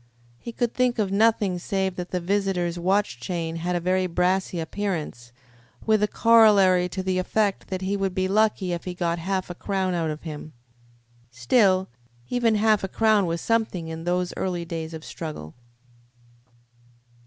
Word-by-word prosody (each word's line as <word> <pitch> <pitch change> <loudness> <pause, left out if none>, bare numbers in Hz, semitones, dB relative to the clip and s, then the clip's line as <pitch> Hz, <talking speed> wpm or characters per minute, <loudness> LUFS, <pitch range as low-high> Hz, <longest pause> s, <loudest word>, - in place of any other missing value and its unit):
He 235 - -7
could 240 0 -2
think 250 -1 +1
of 205 -3 0
nothing 205 -3 +2
save 190 0 -2
that 180 0 -5
the 180 - -1
visitor's 180 -2 -1
watch 190 -7 0
chain 165 +3 -3
had 175 +2 -2
a - - +1
very 185 +1 +1
brassy 180 +1 0
appearance, 160 -8 -4 0.5
with 215 -1 +3
a 210 - +3
corollary 205 -6 +5
to 190 +1 -4
the 185 -1 0
effect 200 +2 0
that 190 0 -4
he 195 +2 -1
would 195 -2 -2
be 185 -1 +1
lucky 210 -2 +1
if 170 - -5
he 180 -1 -5
got 170 -1 -1
half 185 +1 -2
a - - -4
crown 190 0 -2
out 165 -2 -1
of 155 0 -6
him. 155 -1 -8 0.8
Still, 185 - +2 0.4
even 235 -3 +2
half 215 -1 +3
a - - -1
crown 215 -1 +2
was 165 0 -2
something 215 -8 -1
in 160 0 -6
those 180 0 0
early 175 -2 -2
days 165 -1 -5
of 160 - -9
struggle. 150 - -7
185 Hz, 170 wpm, -24 LUFS, 170-205 Hz, 0.8 s, corollary